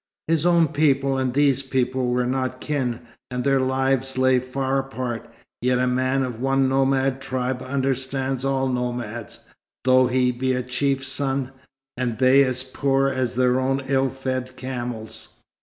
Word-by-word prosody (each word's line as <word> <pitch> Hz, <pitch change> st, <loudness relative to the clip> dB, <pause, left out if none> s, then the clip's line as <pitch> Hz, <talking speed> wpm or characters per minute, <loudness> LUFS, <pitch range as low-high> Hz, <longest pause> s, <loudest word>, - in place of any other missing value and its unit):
His 165 Hz, +1 st, +2 dB
own 170 Hz, -2 st, +4 dB
people 140 Hz, -3 st, +2 dB
and 130 Hz, -1 st, 0 dB
these 140 Hz, 0 st, +3 dB
people 130 Hz, -1 st, -1 dB
were 125 Hz, 0 st, +1 dB
not 130 Hz, 0 st, -2 dB
kin, 130 Hz, -6 st, -2 dB, 0.3 s
and 125 Hz, -1 st, -3 dB
their 135 Hz, -1 st, +3 dB
lives 130 Hz, 0 st, 0 dB
lay 130 Hz, 0 st, +4 dB
far 130 Hz, +1 st, -1 dB
apart; 130 Hz, -3 st, -5 dB, 0.3 s
yet 125 Hz, +1 st, +2 dB
a 125 Hz, -, +2 dB
man 130 Hz, +2 st, +1 dB
of 125 Hz, -2 st, -5 dB
one 135 Hz, 0 st, +2 dB
nomad 135 Hz, 0 st, +1 dB
tribe 130 Hz, -1 st, -2 dB
understands 135 Hz, 0 st, -2 dB
all 135 Hz, -1 st, +1 dB
nomads, 120 Hz, -3 st, -4 dB, 0.4 s
though 130 Hz, 0 st, +5 dB
he 125 Hz, 0 st, +2 dB
be 130 Hz, +1 st, -1 dB
a 125 Hz, 0 st, -1 dB
chief's 135 Hz, +1 st, -1 dB
son, 135 Hz, -1 st, -1 dB, 0.4 s
and 120 Hz, -3 st, -2 dB
they 130 Hz, +1 st, +6 dB
as 130 Hz, -1 st, -1 dB
poor 135 Hz, +1 st, +1 dB
as 130 Hz, -2 st, -2 dB
their 125 Hz, 0 st, +3 dB
own 135 Hz, +1 st, 0 dB
ill 135 Hz, 0 st, +1 dB
fed 130 Hz, -1 st, -4 dB
camels. 120 Hz, -3 st, -6 dB
130 Hz, 155 wpm, -23 LUFS, 125-135 Hz, 0.4 s, they